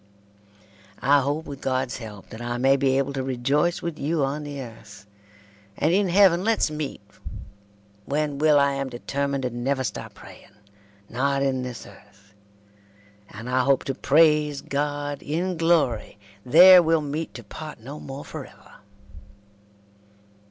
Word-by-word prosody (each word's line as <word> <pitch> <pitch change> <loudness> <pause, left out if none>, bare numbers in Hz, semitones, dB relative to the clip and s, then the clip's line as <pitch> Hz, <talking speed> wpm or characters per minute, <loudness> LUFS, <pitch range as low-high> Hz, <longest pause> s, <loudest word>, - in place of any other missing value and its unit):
I 140 +1 +4
hope 145 +4 -2
with 140 -2 -9
gods 130 -2 -1
helpe 105 -4 -10
that 110 - -9
I 120 0 -3
may 135 +2 +4
be 135 -1 +1
abble 140 0 -1
to 135 - -2
rejoys 135 +7 0
with 170 -3 -4
you 150 0 0
on 145 +3 -4
the 145 -1 -7
earth 110 -5 -11 0.7
and 155 +4 +1
In 195 0 +2
heaven 185 -1 +4
lets 220 -7 +1
meet 150 -2 -5 1.0
when 145 0 -2
will 155 -1 +4
I 140 0 +3
am 135 -1 -3
detemnid 140 +2 -3
to 125 - -2
nuver 130 +3 -2
stope 105 - -6
praying, - - -15 0.5
not 135 +4 0
in 130 -2 0
this 125 -2 -7
earth 100 -1 -19 1.0
and 115 +3 -9
I 130 +1 +1
hope 135 0 +2
to 135 - -3
praise 150 0 +3
god 145 0 -3
In 175 +5 -2
glory 160 -12 +1 0.3
there 180 +7 +8
weel 165 -1 +2
meet 150 +2 -5
to 120 - -8
part 155 +8 -9
no 140 +7 -9
more 135 +1 -8
forever. - - -11
140 Hz, 150 wpm, -24 LUFS, 125-150 Hz, 1.0 s, there